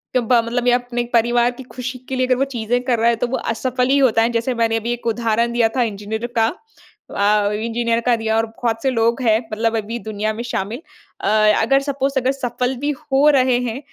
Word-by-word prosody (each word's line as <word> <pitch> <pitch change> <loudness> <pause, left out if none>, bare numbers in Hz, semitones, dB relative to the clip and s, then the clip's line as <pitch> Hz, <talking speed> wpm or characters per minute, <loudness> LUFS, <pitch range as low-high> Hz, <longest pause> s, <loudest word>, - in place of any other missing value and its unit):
दबाव 240 -1 +3
मतलब 240 +1 -2
या 245 0 +5
अपने 245 -1 -3
परिवार 240 +1 +3
की 250 +2 -11
खुशी 255 0 -6
के 265 - -2
लिए 255 0 +1
अगर 255 - +3
वो 270 - +2
चीज़ें 235 +2 0
कर 245 -2 0
रहा 230 - +4
है 235 - +2
तो - - +2
वो 260 - -2
असफल 250 +2 -1
ही 275 - +4
होता 230 -4 +3
है। 230 - +2
जैसे 235 +2 -1
मैंने 225 -1 +1
अभी 230 +1 -3
एक 240 0 -6
उदाहरण 230 0 0
दिया 235 -2 +3
था - - +3
इंजीनियर 220 +1 -4
का। 225 - +4 0.6
अ, 205 0 +2
इंजीनियर 230 +2 -1
का 245 -1 +4
दिया 225 -1 -1
और 225 - +2
बहुत 225 0 -3
से 270 - +2
लोग 235 +1 +1
हैं 220 -3 +3
मतलब 225 +1 0
अभी 225 +2 -4
दुनिया 215 0 -3
में 230 +2 -5
शामिल। 235 +1 -4 0.4
अ, - - -2 0.3
अगर 270 +5 +3
सपोज़ 275 -1 -2
अगर 260 +1 +1
सफल 250 -1 -2
भी 290 +4 -2
हो 280 +1 +2
रहे 255 -3 +3
हैं 245 +1 -3
235 Hz, 230 wpm, -19 LUFS, 225-250 Hz, 0.6 s, या